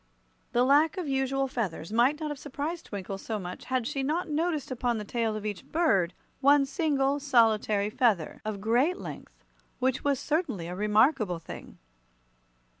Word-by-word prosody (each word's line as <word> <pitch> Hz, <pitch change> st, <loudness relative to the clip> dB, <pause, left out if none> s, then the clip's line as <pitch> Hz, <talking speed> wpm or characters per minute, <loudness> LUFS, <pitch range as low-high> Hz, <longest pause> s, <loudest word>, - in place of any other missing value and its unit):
The 245 Hz, -, +4 dB
lack 290 Hz, +7 st, +4 dB
of 355 Hz, -4 st, -3 dB
usual 270 Hz, 0 st, 0 dB
feathers 200 Hz, -9 st, -4 dB
might 250 Hz, +6 st, +3 dB
not 305 Hz, -2 st, -3 dB
have 290 Hz, -, -6 dB
surprised 300 Hz, +5 st, -5 dB
Twinkle 195 Hz, -1 st, -5 dB
so 220 Hz, +2 st, -3 dB
much 180 Hz, -2 st, -7 dB
had 255 Hz, -2 st, -1 dB
she 275 Hz, +3 st, -2 dB
not 315 Hz, +7 st, -1 dB
noticed 310 Hz, -2 st, -1 dB
upon 245 Hz, -2 st, 0 dB
the 210 Hz, -, -5 dB
tail 225 Hz, 0 st, -1 dB
of 215 Hz, 0 st, -5 dB
each 205 Hz, -2 st, -4 dB
bird 195 Hz, -, +1 dB, 0.2 s
one 280 Hz, +1 st, +5 dB
single, 285 Hz, -2 st, +1 dB
solitary 220 Hz, -6 st, +2 dB
feather 215 Hz, -, +1 dB
of 215 Hz, -2 st, -4 dB
great 245 Hz, -, +2 dB
length, -, -, -10 dB, 0.3 s
which 260 Hz, 0 st, 0 dB
was 280 Hz, -2 st, +1 dB
certainly 290 Hz, -, -1 dB
a 175 Hz, -, -5 dB
remarkable 210 Hz, -, +2 dB
thing. 165 Hz, -, -10 dB
255 Hz, 165 wpm, -28 LUFS, 210-290 Hz, 0.3 s, one